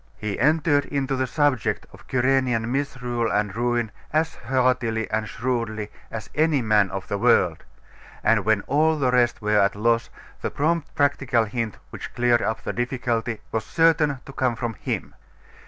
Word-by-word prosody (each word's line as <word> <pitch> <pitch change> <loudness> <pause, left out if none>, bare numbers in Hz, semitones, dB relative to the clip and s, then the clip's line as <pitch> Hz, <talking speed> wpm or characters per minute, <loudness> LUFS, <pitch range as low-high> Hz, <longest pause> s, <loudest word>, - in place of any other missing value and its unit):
He 105 -2 -4
entered 150 +2 +3
into 140 -1 -1
the 130 0 0
subject 145 -4 0
of - - -14
Cyrenian 125 -2 +1
misrule 125 -4 -1
and 105 -1 0
ruin 120 -2 0 0.2
as 160 +1 +1
heartily 125 -2 0
and 110 0 -1
shrewdly 115 -4 -2 0.2
as 115 - -6
any 155 -2 +2
man 105 -3 +3
of 95 0 -5
the 100 - -2
world; - - +3 0.6
and 110 -3 +3
when 110 0 +2
all 155 +6 +2
the 130 -4 +1
rest 120 -2 +2
were 105 0 +3
at 100 0 +2
a - - -9
loss, 115 +1 +2 0.3
the - - -1
prompt 160 +1 -1
practical 135 -5 +2
hint 110 -1 -3
which - - -8
cleared 120 -1 +3
up 110 +1 -2
the - - -3
difficulty 120 -2 -2
was 110 - -1
certain 160 -4 +3
to 140 - -10
come 130 -3 0
from 115 -1 -3
him. - - -4
120 Hz, 170 wpm, -24 LUFS, 110-135 Hz, 0.6 s, entered